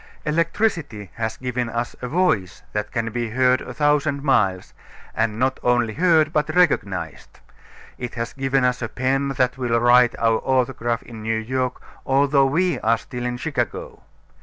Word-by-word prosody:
Electricity 160 Hz, -, -1 dB
has 110 Hz, -1 st, -3 dB
given 125 Hz, -1 st, -3 dB
us 120 Hz, +1 st, -3 dB
a 125 Hz, -, -3 dB
voice 125 Hz, -, 0 dB
that 105 Hz, 0 st, -3 dB
can 115 Hz, -2 st, -2 dB
be 120 Hz, 0 st, -2 dB
heard 130 Hz, +2 st, +2 dB
a -, -, -7 dB
thousand 145 Hz, +1 st, +1 dB
miles, 95 Hz, -10 st, +1 dB, 0.4 s
and 110 Hz, -1 st, -1 dB
not 130 Hz, +2 st, 0 dB
only 120 Hz, -2 st, +1 dB
heard, 160 Hz, -1 st, +3 dB
but 155 Hz, +1 st, 0 dB
recognized. 95 Hz, -, 0 dB, 0.6 s
It 125 Hz, 0 st, -5 dB
has 115 Hz, 0 st, -4 dB
given 135 Hz, -1 st, 0 dB
us 125 Hz, 0 st, 0 dB
a 115 Hz, -, -3 dB
pen 135 Hz, +2 st, 0 dB
that 125 Hz, +1 st, +1 dB
will 120 Hz, -2 st, +1 dB
write 120 Hz, 0 st, +5 dB
our 115 Hz, -1 st, +2 dB
autograph 125 Hz, -2 st, 0 dB
in 115 Hz, -2 st, -10 dB
New 110 Hz, +1 st, -1 dB
York, 125 Hz, +3 st, -2 dB, 0.2 s
although 140 Hz, 0 st, +3 dB
we 175 Hz, +6 st, +1 dB
are 115 Hz, +1 st, +2 dB
still 125 Hz, +2 st, -6 dB
in 125 Hz, 0 st, -3 dB
Chicago. 135 Hz, -3 st, -4 dB
125 Hz, 160 wpm, -22 LUFS, 115-140 Hz, 0.6 s, write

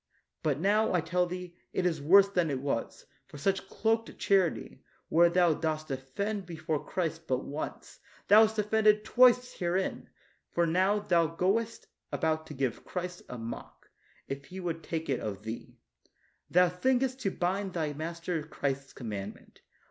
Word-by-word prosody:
But 150 Hz, -3 st, 0 dB
now, 205 Hz, +4 st, +2 dB
I -, -, +4 dB
tell 180 Hz, +2 st, +1 dB
thee, 180 Hz, -1 st, -7 dB, 0.2 s
it 185 Hz, -, 0 dB
is 165 Hz, -4 st, 0 dB
worse 195 Hz, +7 st, +7 dB
than 180 Hz, -5 st, 0 dB
it 135 Hz, -2 st, -1 dB
was, 135 Hz, -4 st, -3 dB, 0.2 s
for -, -, -11 dB
by -, -, -11 dB
such 195 Hz, +2 st, 0 dB
cloaked 225 Hz, +1 st, 0 dB
charity, 190 Hz, -5 st, +1 dB, 0.3 s
where 170 Hz, +2 st, +5 dB
thou 175 Hz, -1 st, +4 dB
dost 155 Hz, -1 st, -2 dB
offend 185 Hz, +10 st, -3 dB
before 160 Hz, -3 st, -3 dB
Christ 165 Hz, -2 st, -3 dB
but 130 Hz, 0 st, -1 dB
once, 145 Hz, +2 st, -6 dB, 0.3 s
thou 210 Hz, +2 st, +8 dB
hast 220 Hz, 0 st, +3 dB
offended 210 Hz, 0 st, +3 dB
twice 250 Hz, +1 st, +5 dB
herein; 180 Hz, +1 st, -2 dB, 0.4 s
for 170 Hz, -, +1 dB
now 185 Hz, +5 st, +2 dB
thou 175 Hz, -5 st, +2 dB
goest 195 Hz, +8 st, -1 dB, 0.3 s
about 160 Hz, 0 st, 0 dB
to 150 Hz, -, -8 dB
give 130 Hz, -3 st, -2 dB
Christ 180 Hz, 0 st, -5 dB
a 125 Hz, -, -6 dB
mock, 115 Hz, 0 st, -8 dB, 0.4 s
if 140 Hz, 0 st, -5 dB
He 185 Hz, +5 st, -8 dB
would 170 Hz, -3 st, -3 dB
take 160 Hz, 0 st, -4 dB
it 135 Hz, -, 0 dB
of 105 Hz, -1 st, -5 dB
thee. 110 Hz, +1 st, -7 dB, 0.7 s
Thou 180 Hz, +1 st, +5 dB
thinkest 255 Hz, +8 st, 0 dB
to 200 Hz, -, 0 dB
blind 190 Hz, +1 st, -2 dB
thy 155 Hz, -3 st, -1 dB
master 165 Hz, +2 st, -3 dB
Christ's 140 Hz, -3 st, -3 dB
commandment. 105 Hz, -5 st, -7 dB
175 Hz, 165 wpm, -30 LUFS, 155-195 Hz, 0.7 s, thou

